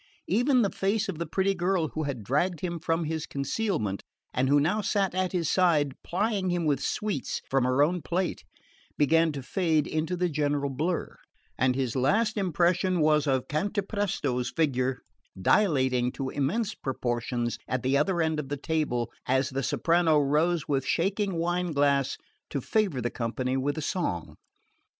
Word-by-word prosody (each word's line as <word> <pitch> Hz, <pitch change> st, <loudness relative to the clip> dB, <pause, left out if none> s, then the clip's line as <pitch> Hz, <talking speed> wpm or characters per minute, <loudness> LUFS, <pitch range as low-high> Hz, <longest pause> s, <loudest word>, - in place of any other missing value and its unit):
Even 245 Hz, +5 st, +3 dB
the 200 Hz, -, 0 dB
face 205 Hz, +3 st, 0 dB
of 180 Hz, -5 st, -4 dB
the 170 Hz, -, -3 dB
pretty 190 Hz, +4 st, +1 dB
girl 175 Hz, -3 st, 0 dB
who 155 Hz, -1 st, -3 dB
had 125 Hz, -6 st, -4 dB
dragged 150 Hz, -, 0 dB
him 175 Hz, -2 st, -3 dB
from 165 Hz, +1 st, 0 dB
his 160 Hz, 0 st, -3 dB
concealment, 140 Hz, -, -2 dB, 0.3 s
and 130 Hz, +1 st, +1 dB
who 145 Hz, +1 st, +5 dB
now 180 Hz, +9 st, +1 dB
sat 195 Hz, -2 st, 0 dB
at 185 Hz, 0 st, 0 dB
his 175 Hz, -4 st, -1 dB
side, 155 Hz, -7 st, +3 dB
plying 195 Hz, 0 st, 0 dB
him 175 Hz, -2 st, 0 dB
with 140 Hz, -3 st, +1 dB
sweets 210 Hz, -11 st, -2 dB
from 135 Hz, -2 st, +3 dB
her 130 Hz, +3 st, +3 dB
own 175 Hz, +3 st, 0 dB
plate, 175 Hz, +4 st, -2 dB, 0.5 s
began 160 Hz, +2 st, +4 dB
to 140 Hz, -3 st, -6 dB
fade 160 Hz, 0 st, +1 dB
into 160 Hz, +3 st, -2 dB
the 180 Hz, +1 st, +1 dB
general 145 Hz, -3 st, 0 dB
blur; 160 Hz, +6 st, -2 dB, 0.4 s
and 130 Hz, -1 st, +2 dB
his 130 Hz, -3 st, -1 dB
last 210 Hz, -, +2 dB
impression 180 Hz, -1 st, +1 dB
was 150 Hz, -1 st, +3 dB
of 130 Hz, -2 st, +1 dB
Cantapresto's 190 Hz, -, -1 dB
figure 130 Hz, -5 st, 0 dB, 0.4 s
dilating 130 Hz, -, +2 dB
to 135 Hz, -1 st, -4 dB
immense 195 Hz, +11 st, -1 dB
proportions 120 Hz, -2 st, -2 dB
at 130 Hz, 0 st, -2 dB
the 130 Hz, +2 st, +2 dB
other 170 Hz, +4 st, +2 dB
end 160 Hz, -1 st, 0 dB
of 135 Hz, -3 st, -5 dB
the 145 Hz, -, -2 dB
table, 135 Hz, -6 st, -1 dB, 0.2 s
as 130 Hz, +2 st, +1 dB
the 135 Hz, +1 st, -1 dB
soprano 165 Hz, +3 st, +2 dB
rose 150 Hz, +4 st, +2 dB
with 135 Hz, -3 st, +1 dB
shaking 195 Hz, +4 st, 0 dB
wine 175 Hz, +1 st, -1 dB
glass 140 Hz, -1 st, +2 dB, 0.3 s
to 140 Hz, -, -2 dB
favour 185 Hz, -, 0 dB
the 120 Hz, -, -2 dB
company 125 Hz, +2 st, -2 dB
with 140 Hz, +3 st, -1 dB
a 155 Hz, -, -3 dB
song. 120 Hz, -, -2 dB
155 Hz, 170 wpm, -27 LUFS, 135-180 Hz, 0.5 s, who